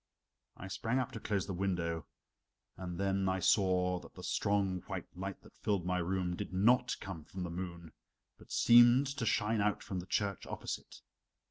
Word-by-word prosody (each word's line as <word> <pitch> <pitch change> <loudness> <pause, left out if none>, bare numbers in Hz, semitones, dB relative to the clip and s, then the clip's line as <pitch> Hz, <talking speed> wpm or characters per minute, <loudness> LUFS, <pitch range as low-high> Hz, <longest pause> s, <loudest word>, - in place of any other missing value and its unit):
I 95 - -7
sprang 115 +6 -1
up 130 -2 -1
to 115 - -6
close 100 -3 -1
the 95 - -4
window, 85 -3 -1 0.7
and 90 -1 -6
then 95 -1 +1
I 95 - +1
saw 90 -1 +3
that - - -14
the - - -10
strong 100 -3 0
white - - -4
light 95 +1 -5
that - - -17
filled 100 -4 -1
my 90 0 +1
room 90 0 -1
did - - -5
not 110 +7 +3
come 95 -5 -7
from 90 +4 -6
the 85 - -4
moon, 85 -2 -6 0.5
but - - -16
seemed 120 +3 +7
to 135 -4 -3
shine 110 -1 +2
out 105 0 0
from 95 - -4
the 90 - -8
church 100 -2 -1
opposite. - - -6
95 Hz, 185 wpm, -34 LUFS, 90-105 Hz, 0.7 s, seemed